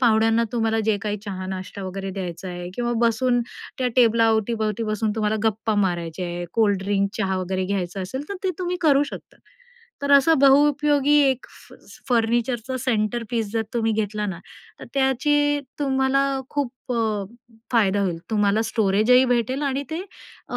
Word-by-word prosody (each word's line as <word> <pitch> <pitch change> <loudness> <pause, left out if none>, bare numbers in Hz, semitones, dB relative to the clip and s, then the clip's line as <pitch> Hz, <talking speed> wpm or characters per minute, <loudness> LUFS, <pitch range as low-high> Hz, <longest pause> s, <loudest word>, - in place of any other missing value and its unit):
पाहुण्यांना 225 -1 +3
तुम्हाला 225 -2 +1
जे 220 -1 +2
काही 210 -1 -2
चहा-नाष्टा 190 0 -6
वगैरे 190 +1 -5
द्यायचा 180 -1 -5
आहे 175 0 -6
किंवा 240 +1 -1
बसून 245 +2 +1 0.4
त्या 255 - +1
टेबलाअवतीभवती 225 -2 +2
बसून 215 0 -1
तुम्हाला 215 0 0
गप्पा 220 0 0
मारायचे 175 -3 -1
आहे, 175 0 -4
कोल्डड्रिंक, 200 -2 +1
चहा 190 -3 0
वगैरे 185 0 -2
घ्यायचं 190 -1 -3
असेल, 260 +9 -5
तर 400 - -4
ते 375 - +2
तुम्ही 360 -1 -2
करू 285 -4 +4
शकता. - - -10 0.7
तर 280 - -1
असं 280 +3 +6
बहुउपयोगी 290 +1 +4 0.2
एक 260 -1 -4
फ - - -18 0.2
स - - -14
फर्निचरचं 240 +1 0
सेंटर 235 -1 0
पीस 225 -4 -1
जर 225 -1 0
तुम्ही 225 -1 +1
घेतला 210 -1 -2
ना, 190 -4 -4 0.4
तर - - -7
त्याची 290 +2 +2 0.2
तुम्हाला 270 -1 +2 0.3
खूप 260 -3 -4
अ, 220 -4 0 0.5
फायदा 205 -4 +3
होईल. 180 -4 -1
तुम्हाला 210 0 +2
स्टोरेजही 220 +3 +3
भेटेल 245 +2 0
आणि 275 -1 -1
ते 320 +2 -3 0.5
अ, - - -3
225 Hz, 155 wpm, -23 LUFS, 200-260 Hz, 0.7 s, असं